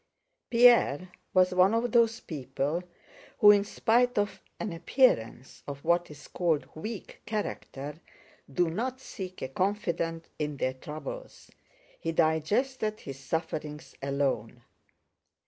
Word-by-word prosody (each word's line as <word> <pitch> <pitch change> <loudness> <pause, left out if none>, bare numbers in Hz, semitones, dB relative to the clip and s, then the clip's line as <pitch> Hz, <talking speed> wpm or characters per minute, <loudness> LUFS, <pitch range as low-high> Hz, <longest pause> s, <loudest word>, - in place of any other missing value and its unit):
Pierre 235 - +5 0.2
was 185 -1 +4
one 185 +4 +5
of 240 +1 0
those 230 -1 +3
people 145 +2 -2 0.6
who, 205 - +9
in 205 -1 +4
spite 240 +4 +2
of 205 0 0 0.2
an 215 -6 -3
appearance 150 - +1
of 140 -1 -6
what 170 +1 +2
is 145 -1 -12
called 165 -4 0
weak 215 +6 -7
character, 155 -8 -4 0.5
do 175 +5 +2
not 250 +8 -2
seek 185 -7 -7
a - - -1
confidant 170 - -1
in 150 -2 -2
their 130 -1 0
troubles. 155 - -8 0.5
He 165 - -2
digested 215 - +1
his 135 -1 -8
sufferings 150 +1 -4
alone. 135 -4 -1
170 Hz, 120 wpm, -29 LUFS, 145-215 Hz, 0.6 s, who